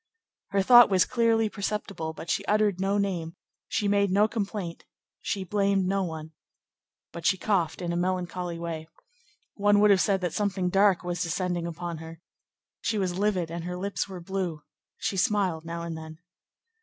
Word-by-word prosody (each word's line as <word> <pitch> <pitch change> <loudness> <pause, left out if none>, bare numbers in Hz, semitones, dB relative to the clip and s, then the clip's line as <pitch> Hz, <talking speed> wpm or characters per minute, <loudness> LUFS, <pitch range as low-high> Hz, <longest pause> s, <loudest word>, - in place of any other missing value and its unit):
Her 195 -1 +1
thought 240 +3 +8
was 190 -2 +4
clearly 230 -2 +2
perceptible, 200 -5 -3
but 160 - -9
she 200 - 0
uttered 210 -3 +2
no 195 +1 +1
name, 175 -5 -2 0.3
she 210 - 0
made 200 0 +3
no 205 +3 +4
complaint, 200 -5 -4 0.4
she 195 -2 -2
blamed 195 0 +1
no 195 +1 +1
one. 160 -2 -6 0.8
But 170 - -8
she 190 - +3
coughed 180 -3 0
in 170 0 -1
a - - -1
melancholy 180 -1 -2
way. 165 -2 -5 0.7
One 205 0 +3
would 210 0 +6
have 190 -2 +5
said 195 -2 +2
that 180 -3 -2
something 195 -3 0
dark 195 -2 +4
was 175 -1 -3
descending 175 0 -1
upon 170 -1 -5
her. 160 0 -10 0.6
She 220 - -1
was 185 -2 -1
livid 190 -5 0
and 170 0 -4
her 180 +1 -4
lips 200 +1 -3
were 185 -2 -7
blue. 175 -4 -3 0.3
She 215 -4 -2
smiled 185 -4 +1
now 170 0 -5
and 170 -1 -4
then. 160 0 -9
185 Hz, 175 wpm, -27 LUFS, 170-200 Hz, 0.8 s, thought